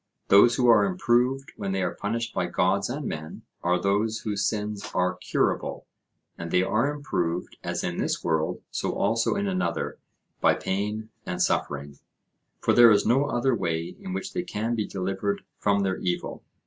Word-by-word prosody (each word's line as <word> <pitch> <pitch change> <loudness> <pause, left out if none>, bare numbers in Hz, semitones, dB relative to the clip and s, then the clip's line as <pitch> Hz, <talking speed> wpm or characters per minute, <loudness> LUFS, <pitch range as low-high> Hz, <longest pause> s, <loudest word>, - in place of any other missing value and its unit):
Those 110 +4 +7
who 125 -1 +2
are 115 - +7
improved 135 -7 +1
when 100 -2 -3
they 95 -1 0
are - - -1
punished 115 +3 -3
by 90 - 0
gods 95 +4 +1
and 140 +3 -4
men, 80 -5 -6 0.2
are 90 +1 +2
those 105 +4 0
whose 100 -2 -2
sins 105 -1 -3
are 90 0 +2
curable; - - -1 0.5
and 85 0 -5
they 90 +2 +3
are 115 +9 +1
improved, 90 - -3
as - - -2
in - - -2
this - - -1
world 80 -2 0
so - - -2
also 115 - +1
in 200 0 -1
another, 185 -2 -2 0.4
by - - +4
pain 105 +3 -3
and - - -4
suffering; 70 0 -1 0.6
for - - +3
there 120 -1 +8
is 105 -2 +4
no 135 +4 +3
other 130 -2 +1
way 85 -5 -2
in 195 -1 -7
which 190 +1 -4
they 180 - -1
can 115 -8 -2
be 110 -3 -1
delivered 95 +2 -2 0.2
from 100 -1 +2
their 95 -1 0
evil. 90 -1 -3
105 Hz, 175 wpm, -26 LUFS, 95-120 Hz, 0.6 s, there